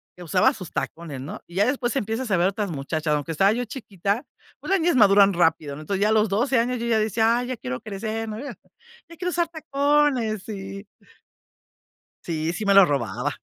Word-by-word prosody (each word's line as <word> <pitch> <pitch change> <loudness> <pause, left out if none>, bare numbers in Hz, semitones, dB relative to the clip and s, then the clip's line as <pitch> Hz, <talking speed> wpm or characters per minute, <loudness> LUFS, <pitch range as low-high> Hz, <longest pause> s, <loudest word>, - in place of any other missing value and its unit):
que 180 - -11
usaba 220 - +3
sus 185 - -9
tacones, 155 -6 -5
¿no? 140 - -7
Y 175 - -14
ya 200 - +3
después 255 -1 -1
empiezas 225 0 -2
a 185 - +3
ver 175 - +3
otras 200 +1 -2
muchachas, 155 +1 -2
aunque 150 +2 -3
estaba 195 +6 +3
yo 240 +3 -1
chiquita, 210 - -3 0.4
pues - - -9
las 390 - +4
niñas 335 -1 +2
maduran 200 -3 +6
rápido, 160 -4 +1
¿no? 150 - -9
Entonces, 195 +5 -3
ya 210 - +3
a - - +2
los 215 0 +3
12 240 +7 +1
años 245 +1 0
yo 235 - -3
ya 225 - +2
decía: 220 +2 +2
"Ay, 245 - -3
ya 255 -1 -4
quiero 125 - -5
crecer", 220 +2 -4
¿no? 215 0 -5
"Ya 280 +2 -7 0.6
quiero 360 +1 -2
usar 345 0 0
tacones". 280 - +1
Sí. 195 -1 -7 1.4
Sí, 165 0 -2
sí 215 - -4
me 200 - +3
lo 195 -2 +8
robaba. 140 -7 -2
210 Hz, 210 wpm, -24 LUFS, 175-245 Hz, 1.4 s, lo